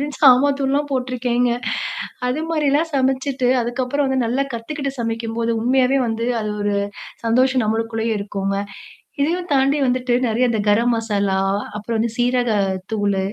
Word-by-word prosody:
அப்படின்னு 290 Hz, -1 st, -4 dB
சாம்பார் 275 Hz, +1 st, +6 dB
தூள்லாம் 280 Hz, +2 st, 0 dB
போட்டுருக்கேங்க. 250 Hz, -1 st, 0 dB, 0.8 s
அது 265 Hz, +5 st, -1 dB
மாரிலாம் 305 Hz, 0 st, +1 dB
சமைச்சுட்டு, 265 Hz, -1 st, +1 dB
அதுக்கப்பறம் 255 Hz, +4 st, -1 dB
வந்து 265 Hz, -2 st, +1 dB
நல்லா 255 Hz, +4 st, +1 dB
கத்துக்கிட்டு 275 Hz, +5 st, -4 dB
சமைக்கும்போது 230 Hz, 0 st, -2 dB
உண்மையாவே 260 Hz, +2 st, +3 dB
வந்து 225 Hz, +1 st, -2 dB, 0.2 s
அது 215 Hz, -1 st, -3 dB
ஒரு 205 Hz, 0 st, 0 dB, 0.5 s
சந்தோஷம் 255 Hz, +1 st, +3 dB
நம்மளுக்குள்ளயே 225 Hz, +1 st, -1 dB
இருக்குங்க. 195 Hz, -1 st, -2 dB, 0.6 s
இதையும் 345 Hz, +5 st, 0 dB
தாண்டி 275 Hz, +2 st, +3 dB
வந்துட்டு, 250 Hz, -1 st, 0 dB
நெறைய 240 Hz, +2 st, +2 dB
இந்த 230 Hz, -2 st, 0 dB
கரம் 230 Hz, +4 st, +3 dB
மசாலா, 200 Hz, -4 st, 0 dB, 0.4 s
அப்பறம் 220 Hz, +2 st, -3 dB
வந்து 225 Hz, +1 st, 0 dB
சீரக 245 Hz, 0 st, +1 dB, 0.4 s
தூளு. 205 Hz, -3 st, 0 dB
245 Hz, 135 wpm, -20 LUFS, 225-270 Hz, 0.8 s, சாம்பார்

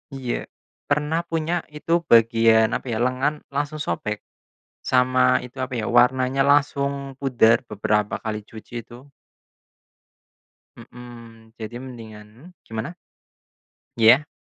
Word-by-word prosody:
Iya. 130 Hz, -3 st, -4 dB, 0.4 s
Pernah 150 Hz, +3 st, 0 dB
punya 165 Hz, +1 st, -1 dB, 0.2 s
itu 150 Hz, +2 st, -6 dB, 0.2 s
bagian 115 Hz, -1 st, +5 dB
apa -, -, -3 dB
ya, -, -, -1 dB
lengan, 130 Hz, +4 st, 0 dB, 0.2 s
langsung 145 Hz, +2 st, -2 dB
sobek, 105 Hz, -1 st, -3 dB, 0.6 s
sama 125 Hz, 0 st, +3 dB
itu 125 Hz, +2 st, -12 dB
apa 130 Hz, 0 st, -4 dB
ya, -, -, -3 dB
warnanya 130 Hz, +2 st, +3 dB
langsung 140 Hz, -1 st, 0 dB
pudar 120 Hz, -4 st, +4 dB
beberapa 105 Hz, 0 st, 0 dB
kali 110 Hz, -1 st, -3 dB
cuci 110 Hz, +1 st, -13 dB
itu. 125 Hz, +4 st, -14 dB, 1.7 s
Hmm, 115 Hz, -2 st, -13 dB
jadi 115 Hz, +2 st, -7 dB
mendingan 115 Hz, +4 st, -12 dB
gimana? 110 Hz, +9 st, -6 dB, 1.0 s
Iya. 120 Hz, +6 st, +6 dB
125 Hz, 110 wpm, -23 LUFS, 115-140 Hz, 1.7 s, Iya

